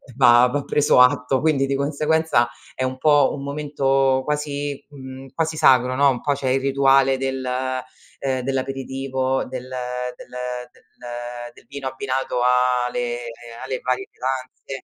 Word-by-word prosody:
va 120 -2 +6
va 140 +3 -2
preso 145 -2 +3
atto. 125 0 +3
Quindi 150 -3 +2
di 140 - 0
conseguenza 150 -2 +1 0.2
è 130 - -3
un 130 0 -2
po' 145 0 +4
un 140 - -7
momento 135 -2 +1
quasi, 145 -1 -3
mhmm, 135 -1 -10
quasi 160 +1 -1
sacro, 130 -2 +4
no, 140 0 +5
un 125 -3 -1
po' 145 - 0
c'è 140 -1 -4
il 135 +1 +2
rituale 135 0 +4
del, 135 0 -2 0.8
ehm, 130 -2 -1
dell'aperitivo, 135 0 -2
del 130 -1 -7 0.5
del - - -13 0.4
del - - -25 0.7
del - - -19
vino 140 -1 -6
abbinato 130 -1 -2
a 125 0 +3
le 120 -1 -2 0.5
alle 130 -1 -3
varie 125 +1 -1
pietanze. 130 +1 -5
135 Hz, 145 wpm, -22 LUFS, 130-140 Hz, 0.8 s, va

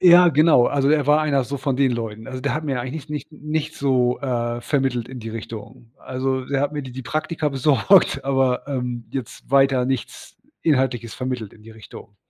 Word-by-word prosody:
Ja, 175 0 +8
genau, 155 -5 +5
also, 140 -1 +1
er 150 -3 +2
war 150 +1 +5
einer 140 -4 +1
so 140 +3 -4
von 135 -1 -1
den 135 -2 +3
Leuten. 115 -1 -5
Also, 130 -1 -6
der 140 - -1
hat 155 +1 -3
mir 135 -4 -1
eigentlich 140 +5 -6
nicht 150 -1 -5
nicht 150 - -16
nichts 155 0 -2
so, 125 -3 +2
äh, 120 -3 -2
vermittelt 130 -5 0
in 130 -2 -8
die 115 - -6
Richtung. 115 +2 -9
Also, 130 0 -2
er 140 -1 0
hat 145 +1 0
mir 145 - -3
die 130 - -8
die 130 0 -7
Praktika 155 +2 -2
besorgt, 140 +3 +3
aber, 135 -2 +1
ähm, 125 -4 -4
jetzt 130 -4 -6
weiter 135 -2 +4
nichts 130 -3 -4 0.3
Inhaltliches 130 -6 +1
vermittelt 125 -5 -4
in 105 - -18
die 115 - -13
Richtung. 110 -1 -13
130 Hz, 205 wpm, -22 LUFS, 120-145 Hz, 0.3 s, Ja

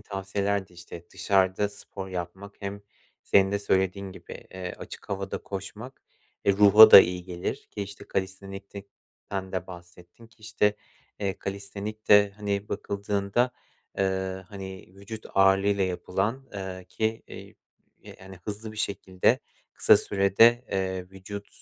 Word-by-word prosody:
tavsiyelerde, 100 -1 -3
işte, 85 -1 -10
dışarıda 95 +2 +2
spor 100 -1 -9
yapmak, 95 +3 -7
hem 100 +1 -5 0.4
senin 95 0 +3
de 100 - +1
söylediğin 95 -1 0
gibi, - - -11
eee, 90 -1 -6
açık - - -10
havada 95 0 -3
koşmak, 105 +6 -8 0.4
eee, 100 - +5
ruha 105 +2 +9
da - - +13
iyi 90 -1 -1
gelir 90 -1 -5
ki, 100 - -4
işte, 100 0 -9
kalistenik'ten 95 0 -6
de 95 -1 -3
bahsettin 90 +4 -13
ki, 110 - -26
işte, 105 -1 +1 0.4
eee, 100 -2 -2
kalistenikte, 100 +1 +1
hani, 100 -1 -3
bakıldığında, 100 +4 -1 0.5
eee, 95 -1 -1
hani, 95 -2 -8
vücut 100 +3 -9
ağırlığıyla 95 +1 +4
yapılan, 100 +8 -2
eee, 95 -2 -6
ki, 110 +3 -2
eee, - - -11 0.6
hani, 95 0 -12
hızlı 110 +1 -6
bir - - -13
şekilde, 95 -3 +1 0.3
kısa - - +6
sürede, 110 +5 +4
eee, 95 -1 -2
vücut, 100 +2 -8
100 Hz, 130 wpm, -27 LUFS, 95-100 Hz, 0.6 s, da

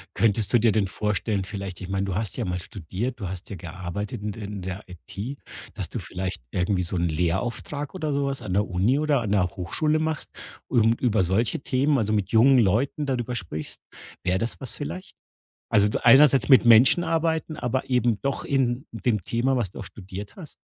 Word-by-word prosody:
Könntest 110 -2 +2
du 120 - +6
dir 115 0 +4
denn 100 -2 +1
vorstellen 105 0 -1
vielleicht 95 -2 -6
ich 95 - -7
meine, 95 0 -1
du 95 - -3
hast 105 0 -3
ja - - -1
mal 90 0 -2
studiert, 100 +8 -5
du 100 - -4
hast 90 0 -7
ja 100 - -5
gearbeitet 95 +6 -6
in 105 - -2
der 105 +1 -7
in 100 -1 -6
der 95 +2 -5
IT, 100 - -7 0.4
dass - - -4
du - - -4
vielleicht 95 -4 -5
irgendwie 90 +1 0
so 90 +1 -3
'n 85 -1 +1
Lehrauftrag 95 - -2
oder 155 -5 -2
so 140 0 0
was 140 -1 -3
an 95 -3 -4
der 105 +1 +2
Uni 100 +9 +2
oder 150 -4 +2
an 105 -4 -3
der 95 -3 +3
Hochschule 150 - 0
machst 160 -1 -3 0.4
und 115 -1 +3
über 110 -6 +2
solche 95 +6 +1
Themen 140 +2 +1
also, 110 -3 0
mit 100 -3 0
jungen 130 +4 +6
Leuten 120 +8 +1
darüber 125 -3 -2
sprichst, 80 -7 -5 0.4
wäre 90 +1 +1
das 115 +3 -3
was 130 - -6
vielleicht? 185 +6 -7 0.6
Also, 105 0 +4
einerseits 135 +2 +6
mit 130 -3 +7
Menschen 120 +9 +6
arbeiten, 160 -1 0
aber 130 +2 -2
eben 120 -4 +2
doch 140 0 -2
in 135 0 0
dem 110 -4 -1
Thema, 130 +3 +1
was 110 -7 -1
du - - -11
auch - - -6
studiert 100 0 -9
hast? 165 -6 -10
110 Hz, 205 wpm, -25 LUFS, 95-130 Hz, 0.6 s, mit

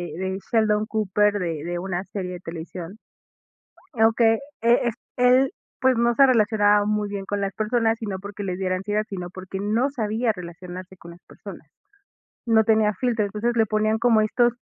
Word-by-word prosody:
de 190 +1 -3
Sheldon 215 -2 +2
Cooper, 210 -1 +1
de 165 -4 -3
de 175 0 -3
una 185 0 -3
serie 185 -2 -5
de 180 - -7
televisión. 170 +3 -8 1.0
Aunque 225 0 +4 0.2
e 235 0 +3 0.2
él, 255 +4 +4 0.3
pues, 260 -1 +3
no 235 +1 +2
se 275 +3 +6
relacionaba 210 -3 +3
muy 210 0 0
bien 200 -1 -5
con 205 0 -2
las 195 0 -2
personas, 225 +1 +1
sino 205 -4 -4
porque 205 +1 -7
le 185 -2 -3
diera 185 -1 -1
ansiedad, 210 +3 -1
sino 180 -3 -5
porque 190 +1 -7
no 220 +6 +1
sabía 225 -2 -1
relacionarse 180 0 -9
con 170 0 -12
las 175 - -16
personas. - - -11 0.8
No 225 -1 +5
tenía 215 -1 +3
filtro, 230 0 0
entonces 230 +4 -2
le 225 - +3
ponían 215 +1 +1
como 230 -2 +4
estos, 240 +3 +2
210 Hz, 170 wpm, -23 LUFS, 190-225 Hz, 1.0 s, se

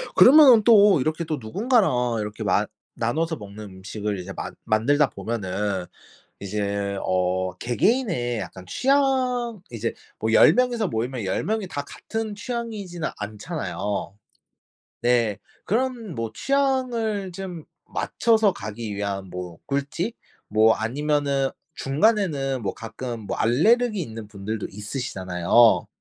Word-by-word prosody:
그러면은 260 -5 +8
또 205 - +6
이렇게 155 +4 -1
또 155 -1 -2
누군가랑 125 - +1
이렇게 105 +1 -5
만 105 +1 +2 0.3
나눠서 160 +8 -1
먹는 105 +1 -9
음식을 100 +1 -5
이제 90 +2 -7
만 - - -6
만들다 135 +6 +3
보면은 100 -3 -3 0.5
이제 100 0 -2
어 95 0 0
개개인의 125 - 0
약간 95 -2 -8
취향, 255 - +1
이제 115 -1 -3 0.3
뭐 110 - 0
10 - - +7
명이서 245 -3 +1
모이면 120 - -3
10 95 - -1
명이 215 -2 -1
다 145 -4 -4
같은 225 -1 -5
취향이지는 210 -7 -4
않잖아요. 105 - -4 0.9
네. 120 -4 +2 0.3
그런 235 -3 -1
뭐 115 -1 -4
취향을 245 - 0
좀 180 -3 -7 0.2
맞춰서 220 -3 +2
가기 105 - -6
위한 100 -2 -3
뭐 90 -2 -7
꿀팁, 145 - -2 0.3
뭐 110 +1 +5
아니면은 140 +3 0 0.2
중간에는 140 - +1
뭐 95 - -2
가끔 115 +1 -6
뭐 105 - -4
알레르기 210 - +3
있는 110 -8 -6
분들도 105 +1 -4
있으시잖아요. 105 -1 +2
130 Hz, 265 characters per minute, -24 LUFS, -, 0.9 s, 그러면은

